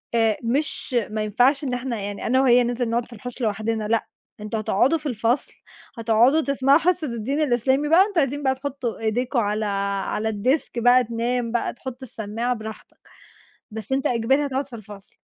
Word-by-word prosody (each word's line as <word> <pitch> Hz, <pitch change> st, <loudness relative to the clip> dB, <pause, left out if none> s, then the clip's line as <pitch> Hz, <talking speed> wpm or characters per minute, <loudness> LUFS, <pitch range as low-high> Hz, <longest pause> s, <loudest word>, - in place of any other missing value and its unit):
آآ، 225 Hz, -2 st, +3 dB
مش 270 Hz, +1 st, -2 dB
ما 215 Hz, 0 st, -2 dB
ينفعش 250 Hz, +7 st, +2 dB
إن 255 Hz, -2 st, -2 dB
إحنا 245 Hz, -3 st, -3 dB
يعني 200 Hz, 0 st, -5 dB
أنا 260 Hz, +2 st, +3 dB
وهي 250 Hz, -2 st, +5 dB
ننزل 240 Hz, 0 st, -1 dB
نقعد 235 Hz, +1 st, 0 dB
في 240 Hz, -, -14 dB
الحوش 245 Hz, +3 st, -8 dB
لوحدنا، 215 Hz, 0 st, -1 dB
لأ، 225 Hz, 0 st, 0 dB, 0.3 s
أنتم 215 Hz, +1 st, -4 dB
هتقعدوا 215 Hz, +8 st, +2 dB
في 305 Hz, -, -10 dB
الفصل، 240 Hz, 0 st, 0 dB, 0.4 s
هتقعدوا 230 Hz, +7 st, +4 dB
تسمعوا 275 Hz, -1 st, +3 dB
حصة 335 Hz, -2 st, +1 dB
الدين 240 Hz, +5 st, -2 dB
الإسلامي 265 Hz, +2 st, +1 dB
بقى، 365 Hz, +4 st, +6 dB
أنتم 400 Hz, -5 st, -1 dB
عايزين 285 Hz, +2 st, -2 dB
بقى 265 Hz, 0 st, +2 dB
تحطوا 260 Hz, -3 st, -4 dB
إيديكم 240 Hz, +3 st, 0 dB
على 210 Hz, 0 st, 0 dB, 0.4 s
على 220 Hz, +1 st, -1 dB
الديسك 240 Hz, +5 st, 0 dB
بقى، 245 Hz, +2 st, +5 dB
تنام 235 Hz, +1 st, -2 dB
بقى، 240 Hz, -, -1 dB
تحطوا 260 Hz, +1 st, -8 dB
السماعة 225 Hz, +4 st, -3 dB
براحتك، 220 Hz, 0 st, -9 dB, 0.7 s
بس 220 Hz, +3 st, -7 dB
أنت 270 Hz, 0 st, +1 dB
إجباري 260 Hz, +5 st, +2 dB
هتقعد 270 Hz, 0 st, -2 dB
في 250 Hz, -4 st, -9 dB
الفصل. 205 Hz, -1 st, -13 dB
245 Hz, 175 wpm, -23 LUFS, 220-270 Hz, 0.7 s, بقى